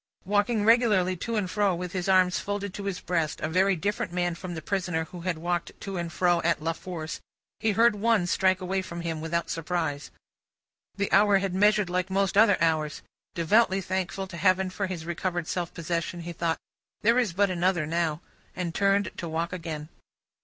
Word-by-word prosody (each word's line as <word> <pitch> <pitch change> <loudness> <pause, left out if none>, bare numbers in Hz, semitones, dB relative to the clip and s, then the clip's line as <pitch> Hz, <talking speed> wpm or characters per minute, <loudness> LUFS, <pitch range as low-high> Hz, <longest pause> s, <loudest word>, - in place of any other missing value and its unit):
Walking 205 +2 +1
regularly 215 -6 +4
to 230 +6 -3
and 205 -3 0
fro 200 0 +1
with 180 0 -5
his 185 0 -2
arms 185 -1 +4
folded 200 -1 -4
on 200 - -5
his 190 -2 -2
breast, 165 -4 -1
a 155 - -2
very 190 +4 +3
different 200 +2 -2
man 175 0 0
from 175 +1 -7
the 160 - -5
prisoner, 180 -3 -1
who 175 +2 -10
had 175 -1 -2
walked 175 +1 -3
to 195 -2 -5
and 170 -1 -3
fro 175 -1 +2
at 170 0 +1
La 165 +2 -1
Force, 165 -2 -6 0.4
he 220 -1 +1
heard 230 +3 +5
One 215 -2 +2
struck 185 +1 +2
away 190 +1 -1
from 170 -2 -7
him, 165 -2 -3
without 170 +1 -2
surprise. 160 -3 -2 0.9
The 200 +1 -2
hour 205 0 +5
had 195 -1 -2
measured 210 +1 +3
like 180 0 0
most 195 0 +1
other 205 0 +6
hours. 155 -2 0 0.3
Devoutly 190 +4 +3
thankful 190 +1 -2
to 185 -2 -9
Heaven 185 +1 +2
for 200 +1 -2
his 175 -4 -5
recovered 175 0 -2
self 175 -3 -2
possession, 170 +1 -3
he 170 +1 -6
thought, 165 0 -1 0.5
"There 230 +3 +5
is 235 -7 +1
but 195 +2 +2
another 175 -2 +1
now," 165 0 -1 0.3
and 180 -3 -3
turned 200 0 +2
to 170 - -4
walk 165 +2 -2
again. 160 -4 -5
180 Hz, 195 wpm, -27 LUFS, 170-195 Hz, 0.9 s, other